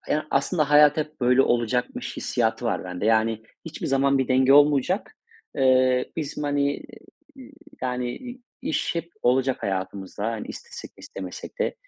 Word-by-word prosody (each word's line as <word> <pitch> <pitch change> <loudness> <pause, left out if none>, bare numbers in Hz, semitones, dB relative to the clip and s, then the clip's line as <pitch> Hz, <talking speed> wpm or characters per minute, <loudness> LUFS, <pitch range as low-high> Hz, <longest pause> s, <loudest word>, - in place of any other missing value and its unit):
haya 155 0 -2
aslında 150 +1 +1
hayat 150 0 +6
hep 155 -1 -4
böyle 125 +2 +4
olacakmış 120 0 -1
hissiyatı 115 0 -1
var 115 - -1
bende. 90 +3 -4
Yani 110 0 +2 0.2
hiçbir 165 - -6
zaman 135 0 +2
bir 130 - 0
denge 130 +1 +4
olmayacak. 145 - +3 0.4
Eee, 130 -1 +3
bizim, 150 -1 -4
hani, 145 0 +1 0.6
y 260 0 -12 0.3
yani, 125 -1 -2
i 250 0 -9 0.2
iş 305 - -1
hep 170 0 -4
olacak 130 +1 +1
hayatımızda. 95 +1 -4
Hani 110 - -5
istesek 475 0 -9
de - - -55
istemesek - - -8
de. 475 - 0
135 Hz, 150 wpm, -24 LUFS, 120-150 Hz, 0.6 s, hayat